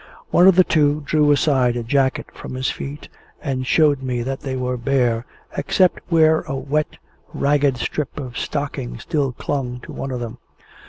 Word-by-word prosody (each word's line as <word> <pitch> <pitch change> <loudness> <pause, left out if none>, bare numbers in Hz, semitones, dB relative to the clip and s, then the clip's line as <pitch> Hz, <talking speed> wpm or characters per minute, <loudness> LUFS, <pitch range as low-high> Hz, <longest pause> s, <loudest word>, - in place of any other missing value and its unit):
One 180 - +6
of 190 - +7
the 185 - +7
two 150 -3 +2
drew 150 0 +3
aside 135 -4 +3
a 120 - -2
jacket 130 +2 +1
from - - -8
his 130 0 -1
feet, 145 +2 -7 0.3
and 130 -3 -3
showed 145 -3 +3
me 125 -2 -2
that 135 +2 -3
they 135 -3 -4
were 125 0 -1
bare, 120 -2 0 0.3
except 185 -2 +2
where 160 -2 +5
a 135 - -3
wet, 145 +3 -2 0.4
ragged 140 -2 +2
strip 145 +5 -3
of 125 -3 -7
stocking 140 -4 -3
still 140 +2 -1
clung 125 -1 -3
to - - -10
one 135 - -4
of 125 -2 -3
them. 120 -2 -6
135 Hz, 175 wpm, -21 LUFS, 125-150 Hz, 0.4 s, of